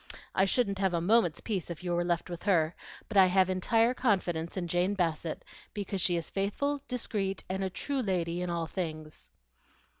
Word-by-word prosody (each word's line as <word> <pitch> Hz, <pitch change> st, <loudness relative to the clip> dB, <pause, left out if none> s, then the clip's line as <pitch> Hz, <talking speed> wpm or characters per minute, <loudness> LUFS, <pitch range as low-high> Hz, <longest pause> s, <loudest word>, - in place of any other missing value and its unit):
I 190 Hz, -, +4 dB
shouldn't 200 Hz, -1 st, +1 dB
have 190 Hz, -3 st, +2 dB
a -, -, +2 dB
moment's 180 Hz, -2 st, +3 dB
peace 195 Hz, -7 st, -3 dB
if 170 Hz, 0 st, -7 dB
you 175 Hz, -1 st, -1 dB
were 175 Hz, 0 st, +1 dB
left 175 Hz, -1 st, 0 dB
with 175 Hz, -1 st, -6 dB
her, 170 Hz, -5 st, +2 dB, 0.3 s
but 215 Hz, -, -2 dB
I 190 Hz, -1 st, +8 dB
have 185 Hz, 0 st, +3 dB
entire 225 Hz, +6 st, +3 dB
confidence 185 Hz, -9 st, 0 dB
in 175 Hz, -2 st, -2 dB
Jane 180 Hz, +4 st, +1 dB
Bassett 165 Hz, -3 st, -1 dB, 0.3 s
because 200 Hz, -2 st, -2 dB
she 175 Hz, -, +3 dB
is 170 Hz, -1 st, -2 dB
faithful, 275 Hz, +9 st, -1 dB
discreet, 205 Hz, -6 st, -2 dB
and 190 Hz, +1 st, -2 dB
a 190 Hz, -, -1 dB
true 275 Hz, +8 st, -2 dB
lady 175 Hz, -5 st, -1 dB
in 180 Hz, -, -2 dB
all 170 Hz, -1 st, -1 dB
things." 155 Hz, -3 st, -6 dB
185 Hz, 190 wpm, -30 LUFS, 170-200 Hz, 0.3 s, I